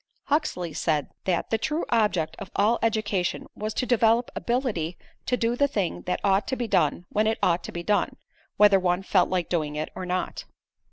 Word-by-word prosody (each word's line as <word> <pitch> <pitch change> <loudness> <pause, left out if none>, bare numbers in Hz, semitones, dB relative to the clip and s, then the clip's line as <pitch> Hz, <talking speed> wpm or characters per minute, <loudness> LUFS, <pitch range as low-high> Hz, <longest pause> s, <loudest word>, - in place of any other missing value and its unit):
Huxley 230 - 0
said 150 -4 0
that: 180 -3 0
"The 225 - +2
true 305 +8 -1
object 210 -9 +1
of 200 -3 -7
all 215 +4 +3
education, 210 -5 0
was 215 +1 -4
to 255 - 0
develop 235 0 +3
ability 220 - -1 0.3
to 250 - +1
do 235 0 +1
the 285 +3 +3
thing 200 -10 -2
that 180 - 0
ought 195 +1 +2
to 260 - -1
be 245 -2 -3
done 155 -2 +1
when 215 +1 +1
it 220 - +1
ought 175 0 +2
to - - -6
be 170 - -5
done, 205 +3 +1 0.4
whether 205 -2 +6
one 180 0 0
felt 190 -2 +3
like 180 -2 0
doing 155 -4 -1
it 155 +1 -3
or 185 - -5
not." 180 +1 -2
200 Hz, 200 wpm, -26 LUFS, 175-230 Hz, 0.4 s, whether